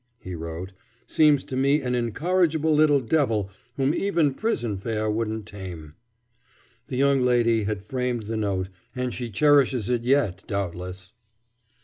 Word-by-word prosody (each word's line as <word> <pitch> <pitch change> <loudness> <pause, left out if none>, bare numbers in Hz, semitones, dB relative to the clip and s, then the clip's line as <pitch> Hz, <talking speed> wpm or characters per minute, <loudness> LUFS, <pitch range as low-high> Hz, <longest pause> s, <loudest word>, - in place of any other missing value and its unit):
he 95 -5 -8
wrote, 85 +3 -6 0.3
"seems 150 -3 +4
to 130 - -6
me 140 +3 +3
an 125 -3 -2
incorrigible 160 - +1
little 150 -2 +4
devil 115 -7 0 0.3
whom 135 +2 +2
even 170 -8 +1
prison 125 - -1
fare 110 +2 -2
won't 110 -1 -2
tame." 90 -7 -9 0.9
The 125 - -4
young 140 0 +3
lady 120 -3 +2
had 105 -1 -3
framed 125 -1 -2
the 110 +2 -4
note, 100 -4 -1 0.3
and 125 -1 -2
she 120 -1 -4
cherishes 130 -1 +3
it 120 -2 +1
yet, 120 -8 +1
doubtless. 95 -1 -4
120 Hz, 140 wpm, -25 LUFS, 100-140 Hz, 0.9 s, seems